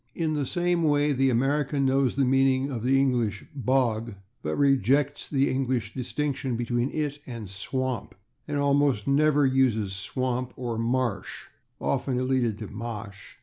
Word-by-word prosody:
In 160 -2 0
the 145 -3 -1
same 175 +1 +1
way 145 -2 +3
the 135 0 +2
American 140 +3 +1
knows 135 -1 +2
the 135 -1 +2
meaning 135 +1 +2
of 120 -4 -3
the 135 +3 +3
English 120 -7 0
/bog/, 120 -5 0 0.3
but 75 0 -2
rejects 140 +1 +2
the 140 -1 +2
English 130 -5 -1
distinction 135 0 -2
between 120 +2 -1
it 145 -1 -3
and 115 -5 -6
/swamp/, 125 +3 -3 0.3
and 145 -1 -2
almost 140 -5 +2
always 145 -1 +3
uses 115 -7 +2
/swamp/, 125 +5 -2
or 120 -3 -3
/marsh/ 120 -2 -1 0.4
(often 130 -1 -1
elided 125 -4 0
to 110 - -6
/ma'sh 105 -2 -6
130 Hz, 145 wpm, -26 LUFS, 120-140 Hz, 0.4 s, way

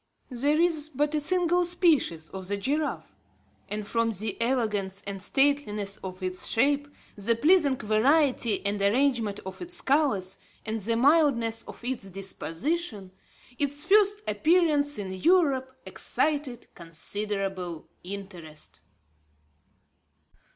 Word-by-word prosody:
There 285 +5 +1
is 320 -3 +1
but 295 +1 -1
a 305 - 0
single 355 +2 +2
species 320 - +1
of 190 -1 -7
the 200 +1 -1
giraffe, 290 +9 -2 0.6
and 210 +1 -3
from 230 0 +1
the 215 -1 -3
elegance 210 -6 -1
and 200 -1 -5
stateliness 215 -5 +1
of 185 0 -8
its 185 0 -2
shape, 285 +4 +2 0.3
the 215 +3 0
pleasing 300 +1 +4
variety 235 0 +2
and 200 0 -1
arrangement 225 -1 +1
of 190 - -8
its 355 0 -3
colours, 255 -10 +1 0.3
and 220 0 -2
the 230 +3 -1
mildness 240 -4 +3
of - - -11
its 240 -6 -3
disposition, 195 - -3 0.5
its 285 +1 -1
first 410 +2 +4
appearance 305 -4 +2
in 195 -2 -5
Europe 275 - +2 0.2
excited 285 -6 -2
considerable 185 0 -3 0.2
interest. 180 -5 -9
235 Hz, 115 wpm, -27 LUFS, 200-295 Hz, 0.6 s, pleasing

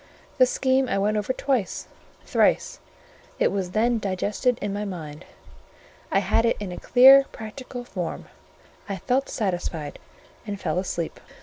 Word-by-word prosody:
This 255 -1 +6
scheme 260 0 +1
I - - 0
went 205 +2 +1
over 210 +4 -1
twice, 260 -5 -1 0.4
thrice; - - +1 0.6
it - - +2
was 195 -2 -2
then 230 +4 +1
digested 205 +5 0
in 205 -1 -3
my 205 +1 -3
mind; 165 -5 -7 0.9
I - - +3
had 205 +4 +2
it 230 - +2
in 200 -3 -5
a 175 - -6
clear 270 +2 +7
practical 245 +3 -8
form: 180 -8 -5 0.6
I 195 - -2
felt 255 +9 0
satisfied, 175 -7 -3 0.4
and 205 -2 -5
fell 180 - -1
asleep. 170 -3 -4
205 Hz, 145 wpm, -25 LUFS, 185-245 Hz, 0.9 s, clear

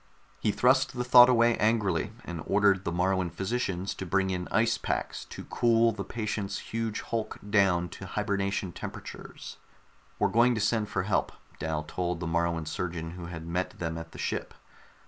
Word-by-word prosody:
_ - - -34 0.4
He 105 - +1
thrust 130 +4 +3
the 125 - 0
thought 125 0 +8
away 120 -1 +4
angrily 105 -3 +1
and 85 -2 -5
ordered 100 -1 +3
the 85 - 0
Moruan 90 +1 +1
physicians 95 0 -2
to - - -6
bring 95 +2 +1
in 90 -1 -3
ice 115 0 +2
packs - - -3
to - - -9
cool 115 -1 +3
the 105 -2 -5
patient's 105 -3 -3
huge 115 -1 -3
hulk 110 -2 -3
down 95 -4 +3
to 95 - -9
hibernation 100 -2 -1
temperatures. - - -8 0.6
"We're 105 - +2
going 120 +4 +4
to - - -1
send 105 0 +1
for 95 -3 -1
help," 100 +1 0 0.3
Dal 80 -1 -2
told 90 +2 -3
the 85 - -4
Moruan 85 0 0
surgeon 80 0 -4
who 85 0 -8
had 80 -1 -7
met 90 +2 -2
them 80 -2 -3
at 80 0 -7
the - - -11
ship. - - -3
95 Hz, 180 wpm, -29 LUFS, 85-110 Hz, 0.6 s, thought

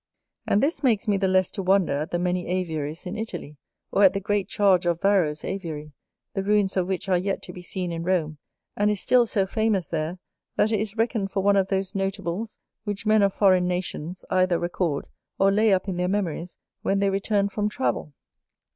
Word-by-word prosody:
And 205 - +3
this 310 +5 0
makes 235 -5 +2
me 205 -1 +3
the 195 0 +1
less 185 0 +2
to 195 - -4
wonder 190 -3 +3
at 150 +3 -2
the 175 - -1
many 180 0 -1
Aviaries 165 -3 -3
in 180 +3 -4
Italy, 215 -9 -6 0.3
or - - +2
at 190 -1 +7
the 195 - -1
great 200 0 -1
charge 190 -3 +3
of 170 -1 +1
Varro's 180 -7 +2
Aviary, 155 -6 -5 0.4
the 195 - -1
ruins 205 -1 +2
of 185 -2 +1
which 190 0 -3
are 185 -2 +3
yet 195 +2 -2
to 180 - -9
be 180 - -9
seen 180 0 -4
in 165 0 -3
Rome, 165 -4 -1 0.4
and 205 0 +2
is 210 -2 0
still 245 +2 +4
so 195 -3 +1
famous 215 -2 0
there, 160 +2 -3 0.4
that 220 - +2
it 215 - +2
is 215 +1 -4
reckoned 225 -3 0
for 195 0 -1
one 200 0 +4
of 195 -1 +3
those 190 -1 -1
notables 195 +1 -3 0.3
which 205 0 -4
men 215 0 +4
of 200 -1 +4
foreign 185 -3 +3
nations 180 -1 -4
either 185 -1 +3
record, 175 -4 -2 0.3
or 195 0 +4
lay 215 +2 +3
up 190 +1 +2
in 185 -2 -2
their 180 0 0
memories 180 -3 -2 0.2
when 195 - +1
they 200 0 +2
return 200 +1 +1
from 210 +1 -1
travel. 210 - -2
190 Hz, 210 wpm, -25 LUFS, 180-205 Hz, 0.4 s, at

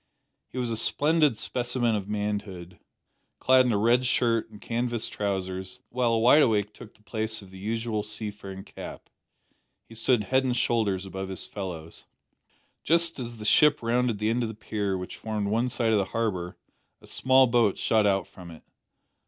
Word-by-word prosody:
He - - -11
was 120 -2 -1
a 115 - -1
splendid 150 +1 +3
specimen 120 +2 -1
of 100 -1 -4
manhood, 100 -4 -4 0.6
clad 130 0 +4
in - - +2
a 105 - +2
red 120 +4 +3
shirt 115 -3 +1
and 105 -1 -13
canvas 120 0 -2
trousers, 95 +1 -4
while 125 -1 +1
a - - +3
wide 125 +7 +6
awake 105 -5 +2
took 115 0 -13
the 105 - -26
place 110 0 -3
of 95 - -15
the 95 - -11
usual 110 +1 -2
seafaring 105 -2 -6
cap. - - -10 0.8
He - - -14
stood 115 0 +2
head 130 +5 +2
and 125 -1 0
shoulders 100 -6 0
above 95 0 -6
his 95 - -4
fellows. 85 -5 -7 0.8
Just 170 -1 +2
as 120 -2 -5
the 105 - -8
ship 150 +4 +4
rounded 120 -1 +1
the 105 +2 0
end 120 +2 0
of 115 - -1
the 110 - -7
pier, 100 -3 -2
which 90 0 -7
formed 105 -2 -3
one 115 +4 +1
side 115 -2 +1
of 105 - +4
the 100 - 0
harbour, 95 -6 -2 0.4
a - - -17
small 130 0 +4
boat 115 -5 +2
shot 110 -2 +2
out 95 -1 +1
from 90 -2 -13
it. 80 -2 -13
110 Hz, 185 wpm, -27 LUFS, 100-120 Hz, 0.8 s, wide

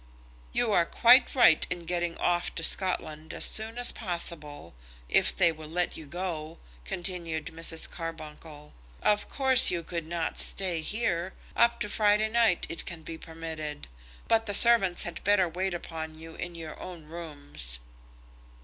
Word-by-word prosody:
"You 235 -3 0
are 170 -4 +3
quite 245 +3 +5
right 170 -11 +6
in 175 -1 -4
getting 175 0 -2
off 175 0 -1
to 165 - -4
Scotland 160 -4 -1
as - - +2
soon 220 +2 +2
as 245 0 +8
possible, 165 - -1 0.3
if - - +2
they 170 - +4
will 155 -1 -11
let 175 +2 -2
you 155 - -9
go," 165 -1 -5 0.3
continued 170 - -3
Mrs. 165 0 +1
Carbuncle. 155 -2 -9 0.3
"Of 210 0 +1
course 265 -2 +4
you 170 -2 -2
could 170 -1 -5
not 170 -1 -3
stay 180 -4 0
here. 185 -2 -2 0.2
Up 235 0 +3
to 210 - -1
Friday 210 +1 +2
night 225 -5 +2
it 170 - -3
can 170 -3 -8
be 165 0 -8
permitted; 160 -2 -7 0.4
but 225 0 +2
the 205 - +1
servants 225 -7 +5
had 175 - -6
better 200 -2 +3
wait 180 +2 -2
upon 160 -2 -7
you 165 0 -11
in 170 +1 -7
your 160 -2 -9
own 175 -4 -9
rooms." 145 - -2
170 Hz, 160 wpm, -28 LUFS, 160-195 Hz, 0.4 s, as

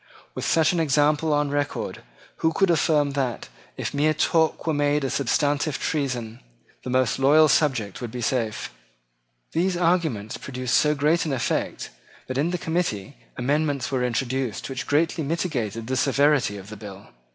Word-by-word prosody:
With - - -4
such 160 +2 +3
an 175 - 0
example 150 +1 +2
on 145 -1 +1
record, 145 0 -2 0.4
who 160 0 +1
could 195 0 +3
affirm 150 -3 +2
that, 135 -4 -2 0.3
if - - -3
mere 155 +2 +2
talk 160 +1 +1
were 160 - +1
made 145 0 +1
a 135 - -1
substantive 145 +2 0
treason, 125 -7 -2 0.4
the - - -5
most 130 0 +1
loyal 150 +4 +6
subject 130 - +1
would 120 - -4
be 125 - -6
safe? 115 - -2 0.8
These 180 +2 0
arguments 165 - 0
produced 130 -2 -4
so 150 0 +3
great 150 +4 +2
an 145 - -1
effect 130 - -2 0.3
that 130 +1 -3
in 155 +4 +1
the 180 - -1
committee 160 - -2 0.2
amendments 145 +1 0
were 130 -2 0
introduced 125 -1 -2
which 130 - -5
greatly 160 +2 +1
mitigated 135 - -2
the 130 +3 -2
severity 140 -4 +2
of 100 +1 -10
the 105 - -8
bill. 100 -1 -10
145 Hz, 165 wpm, -24 LUFS, 125-155 Hz, 0.8 s, loyal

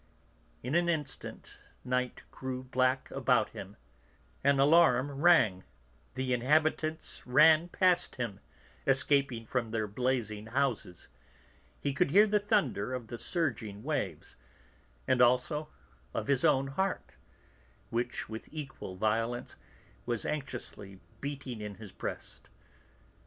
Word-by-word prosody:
In 125 +4 -3
an 175 +1 +3
instant 150 -5 -4 0.3
night 125 0 -1
grew 130 -1 -5
black 130 0 0
about - - +2
him; - - -9 0.7
an 140 0 +4
alarum 145 -1 +5
rang, 135 - +4 0.5
the 130 -1 -1
inhabitants 155 +5 +1
ran 155 +6 +6
past 180 -1 +2
him, 115 -6 -4 0.5
escaping 135 -3 +2
from 120 -1 -2
their 110 -1 -1
blazing 110 -2 -2
houses; 120 -8 -2 0.7
he 140 - -1
could 140 - +2
hear 205 +8 +7
the 210 0 +2
thunder 195 - 0
of 120 -3 -7
the 120 - -6
surging 115 - -2
waves, 105 - -3 0.7
and 130 - +3
also 125 +5 +3 0.5
of - - -1
his 140 -2 +2
own 135 0 +4
heart, 190 +7 -2 0.8
which, 120 +1 -2
with 110 0 -8
equal 135 -11 -7
violence, 115 +4 -1 0.5
was 120 -2 -1
anxiously 120 -9 -5 0.2
beating 135 -5 -5
in 105 -1 -6
his 105 -2 -10
breast. - - -6
130 Hz, 120 wpm, -31 LUFS, 115-150 Hz, 0.8 s, hear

